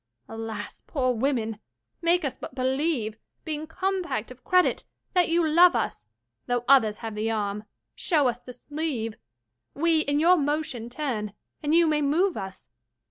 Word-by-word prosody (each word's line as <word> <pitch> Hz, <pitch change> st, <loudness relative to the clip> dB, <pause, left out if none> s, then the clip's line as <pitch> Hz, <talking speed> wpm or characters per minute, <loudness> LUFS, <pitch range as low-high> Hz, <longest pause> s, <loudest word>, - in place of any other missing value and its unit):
20 225 Hz, +9 st, -7 dB
Alas, 225 Hz, -1 st, -6 dB
poor 255 Hz, -4 st, +1 dB
women! 225 Hz, -3 st, -1 dB, 0.4 s
make 340 Hz, -1 st, +3 dB
us 270 Hz, -, -2 dB
but -, -, -9 dB
believe, 260 Hz, -4 st, -1 dB, 0.3 s
Being 310 Hz, 0 st, -4 dB
compact 365 Hz, -, -2 dB
of 255 Hz, 0 st, -13 dB
credit, 365 Hz, -1 st, +3 dB, 0.3 s
that 360 Hz, -2 st, +3 dB
you 335 Hz, 0 st, +3 dB
love 340 Hz, 0 st, +6 dB
us; 165 Hz, -, -2 dB, 0.4 s
Though 245 Hz, 0 st, 0 dB
others 225 Hz, -6 st, +5 dB
have 225 Hz, -1 st, -6 dB
the 215 Hz, +1 st, -1 dB
arm, 210 Hz, -1 st, -2 dB, 0.3 s
show 300 Hz, -7 st, +2 dB
us 240 Hz, -1 st, -1 dB
the 250 Hz, -, -10 dB
sleeve; 270 Hz, -4 st, -3 dB, 0.6 s
We 325 Hz, +2 st, +3 dB
in 290 Hz, -1 st, +1 dB
your 350 Hz, +3 st, +6 dB
motion 290 Hz, -6 st, -2 dB
turn, 240 Hz, -7 st, -3 dB, 0.3 s
and 300 Hz, +1 st, +1 dB
you 340 Hz, 0 st, +6 dB
may 305 Hz, -1 st, +2 dB
move 330 Hz, +6 st, +2 dB
us. 190 Hz, -, -6 dB
275 Hz, 160 wpm, -26 LUFS, 225-320 Hz, 0.6 s, love